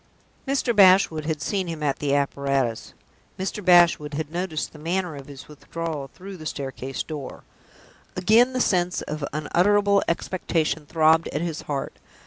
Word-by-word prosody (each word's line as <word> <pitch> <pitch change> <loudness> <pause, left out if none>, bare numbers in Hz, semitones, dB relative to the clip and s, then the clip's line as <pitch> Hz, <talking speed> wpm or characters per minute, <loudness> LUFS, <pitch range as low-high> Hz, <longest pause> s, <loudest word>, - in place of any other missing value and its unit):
Mr. 265 -3 0
Bashwood 185 -5 +5
had 160 -1 -2
seen 195 -3 -1
him 160 -2 -5
at 140 -2 0
the 140 -1 +1
apparatus; 140 -4 -1 0.4
Mr. 195 +2 -4
Bashwood 170 -5 +4
had 155 0 -4
noticed 170 -3 -3
the 155 - -12
manner 175 +1 -2
of 140 -1 -10
his 140 -1 -11
withdrawal 155 -1 -6
through 195 +1 -10
the 155 -2 -7
staircase 135 -2 -5
door. 150 -4 -8 0.7
Again 225 +8 +4
the 255 - 0
sense 180 -4 +1
of 150 +1 -5
an 140 - -2 0.3
unutterable 200 +2 +4
expectation 165 -3 -1
throbbed 160 +1 +3
at 150 - -3
his 165 -2 -3
heart. 140 -2 -4
160 Hz, 155 wpm, -24 LUFS, 145-185 Hz, 0.7 s, Bashwood